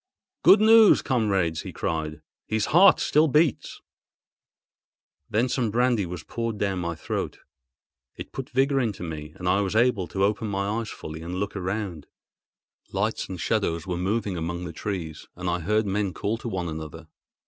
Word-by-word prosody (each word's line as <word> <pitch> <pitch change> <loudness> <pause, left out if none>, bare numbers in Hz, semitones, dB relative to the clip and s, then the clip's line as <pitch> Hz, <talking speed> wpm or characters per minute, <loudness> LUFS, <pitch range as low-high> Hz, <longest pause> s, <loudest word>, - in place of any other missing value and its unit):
"Good 195 - +7
news, 220 0 +7
comrades!" 95 - +1
he - - -7
cried. 80 -2 -3 0.3
"His 110 -1 0
heart 185 +4 +7
still 155 +2 +3
beats!" 150 -2 +1 1.5
Then 115 +4 +2
some 125 -2 0
brandy 120 -3 +1
was 85 -2 -6
poured 115 -2 -4
down 100 -2 -1
my 85 -1 -3
throat; 80 - -4 0.8
it - - -8
put 135 - -6
vigour 135 +1 +2
into 110 -8 -2
me, 75 -2 -6
and 90 - -5
I 95 +3 +3
was 100 +1 -2
able 110 -6 +2
to 95 - -1
open 105 +3 +1
my 100 +3 -1
eyes 115 - -6
fully 80 +1 -8
and 85 +2 -5
look 100 +2 -3
around. 95 -5 -4 0.8
Lights - - -1
and 95 -2 -6
shadows 85 -5 0
were 90 -2 -2
moving 100 +1 -1
among 85 +2 -3
the 85 - -6
trees, 85 -4 -5
and 90 +1 -5
I 90 0 0
heard 105 +6 +1
men 100 -1 -1
call 110 +3 -2
to 120 - -5
one 90 -4 -3
another. 80 0 -7
100 Hz, 170 wpm, -25 LUFS, 85-115 Hz, 1.5 s, Good